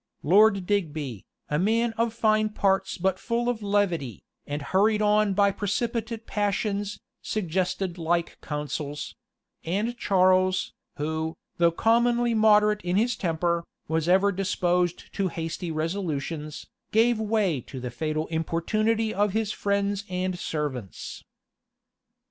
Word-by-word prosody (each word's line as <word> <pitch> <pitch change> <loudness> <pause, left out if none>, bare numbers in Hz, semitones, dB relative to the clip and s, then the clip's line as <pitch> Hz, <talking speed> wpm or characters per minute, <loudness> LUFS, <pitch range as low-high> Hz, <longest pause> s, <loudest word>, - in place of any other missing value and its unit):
Lord 195 +3 +5
Digby, 155 - -2 0.2
a 150 - 0
man 225 +4 +2
of 230 0 +1
fine 215 -1 +2
parts 195 -2 +1
but 185 +1 0
full 235 +1 -1
of 245 -3 -1
levity, 190 - 0 0.2
and 145 0 -3
hurried 210 +6 +2
on 210 -1 +3
by 200 0 +4
precipitate 225 +3 -2
passions, 205 0 -1 0.2
suggested 185 -2 -2
like 170 +1 -1
counsels; 150 -1 -4 0.5
and 205 +8 -1
Charles, 185 -1 +3 0.2
who, 160 +2 -2 0.2
though 170 0 +5
commonly 235 +5 +2
moderate 210 -1 +4
in 180 0 -1
his 230 +3 +2
temper, 170 -2 0 0.2
was 160 +1 0
ever 195 +2 +5
disposed 180 -2 0
to 195 -2 0
hasty 165 0 -4
resolutions, 155 -2 -3 0.3
gave 225 +1 +3
way 210 - +1
to 130 - -7
the 125 -1 -5
fatal 155 +5 -2
importunity 215 +8 0
of 205 0 +1
his 220 -1 0
friends 200 0 0
and 185 0 -2
servants. 135 - -4
190 Hz, 125 wpm, -26 LUFS, 165-215 Hz, 0.5 s, Lord